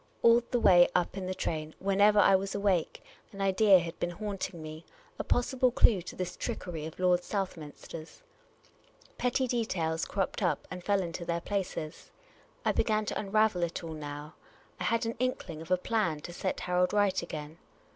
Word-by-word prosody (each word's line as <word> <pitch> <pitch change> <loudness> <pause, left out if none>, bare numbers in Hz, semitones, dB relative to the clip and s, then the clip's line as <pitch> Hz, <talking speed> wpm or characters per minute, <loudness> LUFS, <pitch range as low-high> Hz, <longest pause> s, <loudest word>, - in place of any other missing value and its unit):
All 235 +1 +7
the 245 - +1
way 175 -5 +6
up 180 +1 +1
in 190 -2 -4
the 185 - -3
train, 155 -3 -3
whenever 200 +2 +3
I 195 -1 +6
was 195 +1 -1
awake, 200 -4 0 0.3
an 200 - -11
idea 195 +1 +5
had 170 -1 -4
been 175 - -1
haunting 195 -1 -5
me 155 +1 -8 0.2
— - - -30
a - - -1
possible 255 +1 +2
clue 220 -5 +4
to - - -9
this 180 -1 -4
trickery 160 -4 -4
of 160 - -11
Lord 180 -1 +3
Southminster's. 165 - -6 1.0
Petty 250 +1 +1
details 175 -10 -1
cropped 195 0 -2
up 180 - 0
and 180 -1 -6
fell 200 0 +2
into 170 0 -5
their 170 0 -1
places. 180 -6 -4 0.6
I - - +4
began 215 -1 +1
to - - -2
unravel 210 -2 +2
it 170 0 -2
all 165 -1 -5
now. 150 0 -7 0.5
I - - -2
had 230 +1 +1
an 230 - -1
inkling 190 -11 -2
of 165 - -10
a 185 - +4
plan 180 -6 -1
to 175 - -8
set 185 +2 -3
Harold 180 +1 +1
right 205 -2 +2
again. 155 -1 -7
185 Hz, 185 wpm, -30 LUFS, 170-205 Hz, 1.0 s, All